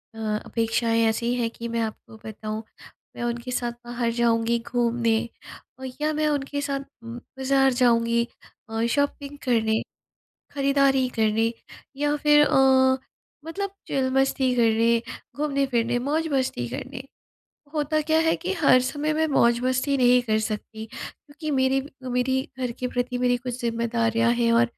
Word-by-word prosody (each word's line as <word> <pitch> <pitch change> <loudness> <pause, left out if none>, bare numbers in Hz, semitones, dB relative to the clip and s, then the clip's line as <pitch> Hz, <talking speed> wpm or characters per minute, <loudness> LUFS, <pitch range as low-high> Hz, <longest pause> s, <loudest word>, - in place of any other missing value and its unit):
अ 215 -1 -2
अपेक्षाएँ 230 0 +1
ऐसी 235 +2 -1
हैं 235 -2 0
कि 235 0 -7
मैं 230 0 -1
आपको 220 0 -6
बताऊँ 215 0 -5 0.5
मैं - - -5
उनके 240 +1 -3
साथ 240 -1 -1
बाहर 240 -1 -1
जाऊँगी 235 0 +2
घूमने 235 -2 +1 0.8
या 305 +1 +1
मैं 305 0 +1
उनके 285 0 -2
साथ 280 -1 -2 0.3
बाज़ार 265 +3 0
जाऊँगी 235 -1 +3 0.5
अ, 225 +1 -1
शॉपिंग 285 +1 -1
करने, 220 -3 +2 0.7
खरीदारी 275 -2 +3
करने 220 +1 +2 0.4
या 295 +1 +1
फिर 295 0 +5
अ, 260 -1 +4 0.5
मतलब 395 +5 -4 0.2
चिल 260 -1 0
मस्ती 265 -1 +2
करने, 230 0 +3 0.4
घूमने-फिरने, 270 -5 0
मौज-मस्ती 275 - -1
करने। 255 - -6 0.7
होता 305 0 +1
क्या 315 +1 +2
है 325 0 +3
कि 370 +2 -3
हर 265 -4 +6
समय 290 +4 -1
मैं 315 +1 +2
मौज-मस्ती 255 +1 +2
नहीं 250 -1 +5
कर 220 -2 +1
सकती 220 0 -5
क्योंकि 300 +3 -8
मेरी 265 -1 +2 0.3
मेरी 250 +1 +1 0.2
घर 250 -2 -2
के 255 - 0
प्रति 245 0 -2
मेरी 245 0 +2
कुछ 250 0 -6
ज़िम्मेदारियाँ 230 -1 +1
हैं 235 -1 +2
और 235 +1 +5
250 Hz, 140 wpm, -25 LUFS, 230-275 Hz, 0.8 s, हर